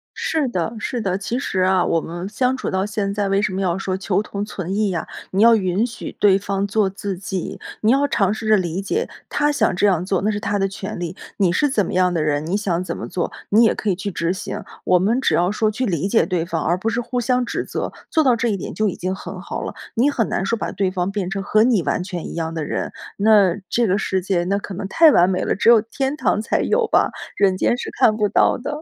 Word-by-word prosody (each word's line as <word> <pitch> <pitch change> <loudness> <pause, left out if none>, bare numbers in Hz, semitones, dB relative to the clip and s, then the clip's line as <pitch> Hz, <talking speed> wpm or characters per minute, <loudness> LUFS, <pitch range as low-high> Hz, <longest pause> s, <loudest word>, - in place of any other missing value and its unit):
是 310 -4 0
的， 205 +2 -2
是 245 +2 -3
的， 190 -2 -1
其 230 +5 -3
实 190 -8 -1
啊， 185 0 +3
我 165 - +1
们 175 +3 -6
相 250 +5 0
处 - - -3
到 190 +1 0
现 210 -2 -2
在 200 -1 -1
为 195 +1 +2
什 210 -2 -1
么 190 - -2
要 180 -2 0
说 190 -1 -2
求 190 +1 0
同 200 -1 -5
存 190 -3 -5
异 210 -1 +1
呀， 170 -4 -3 0.2
你 190 - +1
要 230 +1 +7
允 190 +2 +1
许 230 - -8
对 195 -2 +5
方 200 0 -2
做 205 -1 +1
自 195 -1 -5
己， 190 -1 -5 0.2
你 220 - +3
要 280 +2 +3
尝 200 -4 +1
试 220 0 -5
着 215 -1 +5
理 180 +1 -2
解 430 - -2 0.2
他 295 0 +1
想 290 - +1
这 205 +3 +3
样 180 -2 +1
做， 190 -2 0
那 210 - +1
是 205 - -1
他 205 -1 -1
的 195 - +2
权 195 0 -6
利， 175 0 -4 0.2
你 190 -4 +3
是 290 +11 +2
怎 210 -8 +1
么 - - -5
样 180 -1 +2
的 165 - 0
人， 150 0 0
你 190 +5 0
想 185 -4 -1
怎 - - -4
么 - - -6
做， 180 -1 -3 0.2
你 220 +3 +5
也 225 - +4
可 215 - -3
以 185 - +2
去 200 +2 -4
执 170 +1 -1
行， - - -5 0.2
我 180 -1 +4
们 225 +7 +2
只 - - +2
要 175 +2 +3
说 215 +1 +1
去 255 +4 -2
理 185 -1 -1
解 225 - +3
对 175 -3 -1
方， 165 -2 -2
而 175 +2 +2
不 215 +5 -1
是 230 +1 -1
互 245 0 -2
相 250 +1 +1
指 - - -3
责， - - -4 0.2
做 315 - +3
到 250 -3 +4
这 235 0 0
一 200 - 0
点 - - -6
就 215 -1 +1
已 - - -5
经 185 +1 -3
很 190 0 -8
好 - - -5
了。 - - -5 0.2
你 255 +6 +3
很 230 -6 0
难 190 - -1
说 230 +3 0
把 - - -3
对 195 -2 0
方 180 0 -1
变 195 -3 -3
成 195 0 -3
和 215 +2 +3
你 230 -6 +3
完 180 - -1
全 180 -2 -5
一 - - -7
样 165 -1 -3
的 160 -2 -3
人， - - -3 0.3
那 200 -4 +5
这 235 -2 +2
个 190 +2 +2
世 190 -2 -1
界 175 -2 0
那 195 +3 0
可 200 -1 -6
能 195 +2 -5
太 325 +5 +6
完 175 -3 +5
美 185 - 0
了， - - 0
只 215 - +3
有 235 -2 +8
天 270 +6 -3
堂 210 - +1
才 220 - 0
有 475 - +2
吧， - - +2 0.3
人 195 -2 +3
间 240 - +1
是 - - -5
看 215 -1 +3
不 210 - +2
到 200 - +3
的。 295 +4 -5
200 Hz, 295 characters per minute, -21 LUFS, 185-220 Hz, 0.3 s, 有